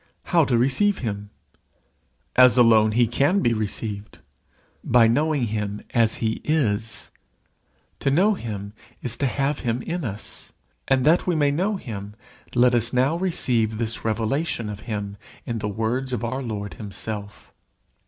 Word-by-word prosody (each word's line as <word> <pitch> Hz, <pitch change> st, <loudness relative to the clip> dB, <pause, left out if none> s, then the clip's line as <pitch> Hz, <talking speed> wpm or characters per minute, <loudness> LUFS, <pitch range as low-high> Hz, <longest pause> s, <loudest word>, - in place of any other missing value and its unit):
How 170 Hz, -4 st, +3 dB
to 125 Hz, -3 st, +2 dB
receive 140 Hz, -, +2 dB
him? 100 Hz, -1 st, -4 dB, 1.1 s
As 125 Hz, 0 st, +7 dB
alone 110 Hz, -3 st, +5 dB
he 120 Hz, +2 st, +4 dB
can 140 Hz, -, +2 dB
be 120 Hz, -, +2 dB
received, 105 Hz, -1 st, -4 dB, 0.7 s
by 120 Hz, -1 st, +5 dB
knowing 145 Hz, +3 st, +1 dB
him 105 Hz, -2 st, -3 dB
as 115 Hz, -2 st, +3 dB
he 110 Hz, -1 st, -2 dB
is. 115 Hz, -8 st, -1 dB, 0.9 s
To -, -, +1 dB
know 185 Hz, +10 st, +4 dB
him 105 Hz, -, -6 dB, 0.3 s
is 120 Hz, -2 st, +1 dB
to 140 Hz, -, +1 dB
have 140 Hz, +3 st, -1 dB
him 120 Hz, 0 st, -2 dB
in 175 Hz, 0 st, -3 dB
us. 110 Hz, -4 st, -7 dB, 0.3 s
And 130 Hz, -1 st, +2 dB
that 165 Hz, +5 st, +4 dB
we 180 Hz, -, +2 dB
may 145 Hz, -2 st, +3 dB
know 190 Hz, +8 st, 0 dB
him, 105 Hz, -, -7 dB, 0.4 s
let 125 Hz, 0 st, +5 dB
us 120 Hz, -1 st, +1 dB
now 130 Hz, +5 st, +2 dB
receive 125 Hz, -, +1 dB
this 115 Hz, 0 st, -2 dB
revelation 115 Hz, +3 st, -1 dB
of 105 Hz, -, -7 dB
him, 100 Hz, -2 st, -4 dB, 0.3 s
in 115 Hz, -1 st, -3 dB
the 105 Hz, -1 st, -3 dB
words 120 Hz, +5 st, -2 dB
of 120 Hz, -, -2 dB
our 130 Hz, +3 st, -2 dB
Lord 105 Hz, -5 st, -5 dB
himself. 105 Hz, 0 st, -7 dB
120 Hz, 155 wpm, -23 LUFS, 110-140 Hz, 1.1 s, As